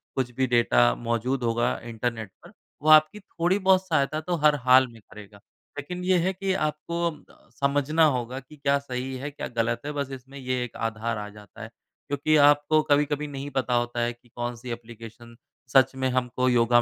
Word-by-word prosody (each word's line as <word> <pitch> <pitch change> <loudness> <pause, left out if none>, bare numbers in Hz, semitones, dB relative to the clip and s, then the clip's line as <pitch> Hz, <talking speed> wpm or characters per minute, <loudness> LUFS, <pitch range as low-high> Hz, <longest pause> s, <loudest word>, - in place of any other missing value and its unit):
कुछ 130 -2 -1
भी 130 +1 +1
डेटा 60 - +3
मौजूद 120 +3 -2
होगा 120 +1 +1
इंटरनेट 115 -2 -4
पर, - - -14 0.3
वो 155 - +1
आपकी 155 +7 -2
थोड़ी-बहुत 190 0 +1
सहायता 155 -2 +1
तो 175 +2 -2
हर 150 -1 +6
हाल 130 0 +7
में 115 -2 -15
करेगा। 105 -1 -13 0.4
लेकिन 180 +5 -6
ये 185 0 +3
है 190 - 0
कि 190 +1 -2 0.2
आपको 165 +1 -6
समझना 145 +3 +2
होगा 125 +2 -5
कि 135 +3 -16
क्या 140 0 +2
सही 130 -1 -5
है, 145 +3 -6
क्या 145 - -6
गलत 115 +1 0
है, 150 - -3
बस 140 -2 -4
इसमें 135 +2 -14
ये 130 -1 -2
एक 120 - -8
आधार 110 +1 -4
आ 105 0 -5
जाता 105 +2 -14
है। - - -7 0.4
क्योंकि 145 +2 +1 0.2
आपको 145 +1 +2
कभी-कभी 145 +1 +2
नहीं 140 0 -6
पता 125 -1 0
होता 120 0 0
है 120 0 0
कि 120 0 -27
कौन-सी 120 0 -5
एप्लीकेशन 115 0 -10 0.4
सच 135 0 +5
में 130 0 -1
हमको 125 0 0
योगा 120 0 +4
130 Hz, 185 wpm, -25 LUFS, 120-145 Hz, 0.4 s, हाल